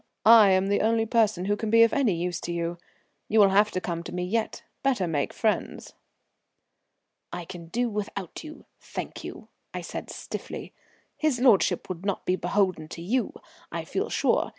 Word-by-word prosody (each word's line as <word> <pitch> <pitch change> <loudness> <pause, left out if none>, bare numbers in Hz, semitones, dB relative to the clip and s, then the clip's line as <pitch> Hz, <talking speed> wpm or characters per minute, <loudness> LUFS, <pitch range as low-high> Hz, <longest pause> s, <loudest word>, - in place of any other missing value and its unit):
I 220 -2 +9
am 190 0 +3
the 200 - +2
only 225 0 +2
person 220 -5 +2
who 205 +1 +1
can 215 +1 -3
be 230 +1 +7
of 230 - +3
any 240 -10 +2
use 175 +1 -3
to 175 - -4
you. 170 0 -3 0.5
You 220 - +3
will 200 -2 +7
have 205 +2 +4
to 185 - -2
come 170 -2 -3
to - - -7
me 180 0 -3
yet. 220 +5 -2 0.2
Better 260 -8 +1
make 150 -4 -1
friends." 220 -2 -2 1.4
"We 175 - -5
can 175 -2 -9
do 240 +8 0
without 205 - -5
you, 310 0 -11
thank - - -7
you," - - -9 0.3
I - - -3
said - - -6
stiffly. - - -7 0.4
"His 305 -6 +1
lordship 240 -6 +3
would 180 -1 -6
not 200 -1 -2
be 185 - +2
beholden 180 -2 0
to 165 - -8
you, 240 +7 0 0.4
I - - -4
feel - - -2
sure. - - +1
200 Hz, 185 wpm, -26 LUFS, 180-225 Hz, 1.4 s, I